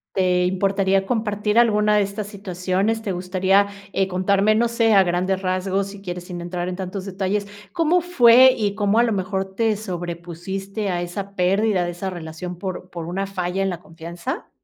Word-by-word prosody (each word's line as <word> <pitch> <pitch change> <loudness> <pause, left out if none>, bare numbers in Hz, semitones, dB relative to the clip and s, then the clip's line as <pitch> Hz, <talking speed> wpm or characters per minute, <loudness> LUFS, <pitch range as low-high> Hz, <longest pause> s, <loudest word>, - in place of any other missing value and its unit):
¿Te 180 -1 +2
importaría 195 +1 +1
compartir 210 -1 0
alguna 210 -2 +3
de 210 - +4
estas 200 +1 -3
situaciones? 195 +2 -2
¿Te 205 - -2
gustaría, 185 +2 +2 0.3
eh, 195 - +1
contarme, 195 +3 +2
no 235 +2 +3
sé, 230 -1 +2
a 195 -1 +7
grandes 185 +2 0
rasgos, 185 +1 0
si 200 0 -10
quieres, 180 -2 -6
sin 175 -1 -6
entrar 175 0 -4
en 180 - -3
tantos 190 +1 -5
detalles? 195 +1 -2 0.3
¿Cómo 335 +2 +2
fue, 260 -7 +7
y 205 -3 0
cómo 205 0 +1
a 235 - +6
lo 230 -2 +1
mejor 190 0 -2
te 225 0 +2
sobrepusiste 185 +2 -5
a 175 -1 -1
esa 195 +3 -6
pérdida 190 +1 +2
de 175 - -3
esa 175 +3 -4
relación 175 0 -7
por 185 0 -6
por 170 -2 -6
una 190 +4 -3
falla 185 -1 -2
en 195 - +1
la 175 -2 -5
confianza? 170 +9 -7
195 Hz, 185 wpm, -22 LUFS, 180-210 Hz, 0.3 s, a